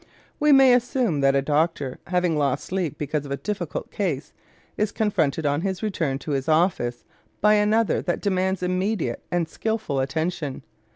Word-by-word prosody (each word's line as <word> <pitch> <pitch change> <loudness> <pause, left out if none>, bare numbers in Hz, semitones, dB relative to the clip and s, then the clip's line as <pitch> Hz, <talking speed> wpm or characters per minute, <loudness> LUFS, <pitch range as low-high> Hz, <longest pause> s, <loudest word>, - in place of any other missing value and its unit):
We 300 0 +4
may 270 -2 +7
assume 245 - +1
that 135 0 +4
a 135 - +2
doctor, 150 -2 0
having 180 -2 +1
lost 140 -2 0
sleep 180 -6 -2
because 150 0 -2
of 140 - -9
a 140 - -1
difficult 190 -5 -4
case, 160 -9 -2 0.4
is 210 -1 0
confronted 165 -8 0
on 145 +1 +1
his 190 +1 -3
return 165 -10 -1
to 155 - -3
his 135 +1 -1
office 155 -7 +1 0.4
by 210 +1 +5
another 215 +1 +2
that 175 - -1
demands 190 -2 0
immediate 185 - -1
and 175 -2 0
skilful 220 -12 -2
attention. 150 0 -2
175 Hz, 165 wpm, -24 LUFS, 145-205 Hz, 0.4 s, may